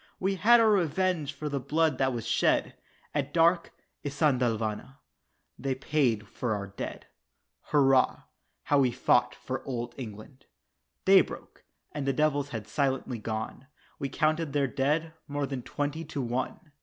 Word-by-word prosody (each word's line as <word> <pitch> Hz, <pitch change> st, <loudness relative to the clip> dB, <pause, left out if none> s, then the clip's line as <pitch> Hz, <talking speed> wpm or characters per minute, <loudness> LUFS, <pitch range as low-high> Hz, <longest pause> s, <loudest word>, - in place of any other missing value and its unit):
We 190 Hz, +1 st, +1 dB
had 220 Hz, +6 st, +6 dB
our 225 Hz, -1 st, +5 dB
revenge 180 Hz, -4 st, +1 dB
for 150 Hz, +2 st, -5 dB
the 140 Hz, -1 st, -1 dB
blood 160 Hz, +4 st, +1 dB
that 130 Hz, 0 st, +2 dB
was 120 Hz, -3 st, -4 dB
shed, -, -, +2 dB, 0.4 s
At 145 Hz, 0 st, -2 dB
dark 170 Hz, +1 st, +4 dB, 0.3 s
"Isandhlwana" 125 Hz, -5 st, 0 dB, 0.6 s
they 135 Hz, 0 st, -1 dB
paid 130 Hz, -6 st, 0 dB
for 110 Hz, 0 st, -2 dB
our 100 Hz, -1 st, -4 dB
dead. 100 Hz, 0 st, -7 dB, 0.6 s
"Hurrah, 135 Hz, -3 st, +3 dB, 0.4 s
how 145 Hz, -, +3 dB
we 130 Hz, -2 st, +4 dB
fought 120 Hz, -, +2 dB
for -, -, -5 dB
Old 120 Hz, -2 st, -4 dB
England." 115 Hz, +3 st, -9 dB, 0.6 s
Day -, -, +8 dB
broke, -, -, -9 dB, 0.3 s
and 140 Hz, -2 st, -4 dB
the 135 Hz, -, +2 dB
devils 145 Hz, -1 st, +1 dB
had 110 Hz, -5 st, -6 dB
silently 135 Hz, -1 st, -1 dB
gone, 110 Hz, +4 st, -5 dB, 0.3 s
We 140 Hz, -, -2 dB
counted 155 Hz, -1 st, 0 dB
their 145 Hz, -1 st, +2 dB
dead, 150 Hz, +5 st, 0 dB
more 145 Hz, 0 st, -1 dB
than 135 Hz, -2 st, -4 dB
twenty 145 Hz, +5 st, -3 dB
to 145 Hz, -, -5 dB
one! 130 Hz, +7 st, -3 dB
140 Hz, 150 wpm, -29 LUFS, 125-155 Hz, 0.6 s, Day